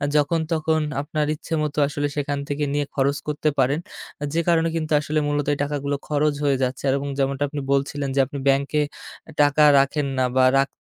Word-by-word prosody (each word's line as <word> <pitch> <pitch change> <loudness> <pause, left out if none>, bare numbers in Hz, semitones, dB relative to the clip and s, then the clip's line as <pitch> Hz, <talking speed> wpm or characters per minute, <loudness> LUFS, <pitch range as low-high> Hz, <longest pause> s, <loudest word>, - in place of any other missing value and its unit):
যখন 150 +3 +2
তখন 160 0 +1 0.2
আপনার 150 +1 -2
ইচ্ছেমতো 150 -1 -3
আসলে 145 0 -2
সেখান 145 -1 -2
থেকে 145 +1 -1
নিয়ে 145 0 0
খরচ 140 +1 +1
করতে 150 0 0
পারেন। 140 +4 +1 0.5
যে 165 - +2
কারণে 165 0 +3
কিন্তু 160 -1 -3
আসলে 155 +1 -1
মূলত 145 -1 0
এই - - -3
টাকাগুলো 145 0 -2
খরচ 150 0 +1
হয়ে 140 -2 +2
যাচ্ছে। 130 0 -2
আর 130 - +3
এবং 140 - -4
যেমনটা 135 +1 0
আপনি 145 -1 -4
বলছিলেন 140 0 -1
যে - - +2
আপনি 140 +2 -7
ব্যাংকে 140 +2 +2 0.6
টাকা 145 +1 +4 0.2
রাখেন 140 +1 +1
না 130 - +2
বা 130 - +5
রাখ 135 0 +3
145 Hz, 190 wpm, -23 LUFS, 140-150 Hz, 0.6 s, বা